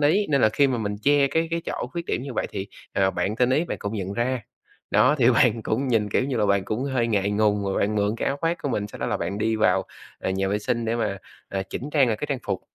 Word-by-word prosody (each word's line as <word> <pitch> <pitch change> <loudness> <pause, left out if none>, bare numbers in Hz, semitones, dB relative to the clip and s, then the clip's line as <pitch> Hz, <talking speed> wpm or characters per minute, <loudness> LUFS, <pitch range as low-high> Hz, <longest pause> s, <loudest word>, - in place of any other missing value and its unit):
ý, 170 +8 +3
nên 140 -2 +3
là 110 - +6
khi 140 +6 +3
mà 130 -3 0
mình 105 -2 -2
che 145 +1 +4
cái 160 +4 0
cái 170 0 -1
chỗ - - -3
khuyết 170 -1 -4
điểm - - -1
như 135 -1 -6
vậy - - -1
thì, 95 - -4 0.3
ờ, 95 -1 +2
bạn 105 +2 -2
tinh 125 +1 +3
ý 145 +6 +2
bạn - - -4
cũng 100 +1 -4
nhận 95 -2 -3
ra. 120 +2 -1 0.5
Đó, 145 - +5
thì 125 -1 +5
bạn 115 -1 +3
cũng 130 +6 -1
nhìn, 110 -4 +2
kiểu 125 - +2
như 135 -2 -2
là, 105 -2 +2
bạn 100 -1 +2
cũng 110 +7 -2
hơi 130 -4 0
ngại 100 -3 +1
ngùng 105 -1 +2
rồi 95 0 -1
bạn 105 +2 +1
mượn 105 0 +1
cái - - -2
áo 135 - -1
khoác 165 +1 0
của - - -1
mình 105 -5 -1
sau - - -11
đó - - -2
là - - 0
bạn 90 +4 -3
đi 110 +1 +1
vào, 110 - +3 0.3
à, - - -2
nhà 95 +1 0
vệ 100 +2 0
sinh 115 +3 -1
để 115 +1 0
mà, 105 -4 -1 0.3
à, 95 -1 -2
chỉnh 130 +9 -6
trang 145 -3 +4
lại 110 - 0
cái 150 - -4
trang 140 -3 -1
phục. - - -1
115 Hz, 295 wpm, -24 LUFS, 105-135 Hz, 0.5 s, là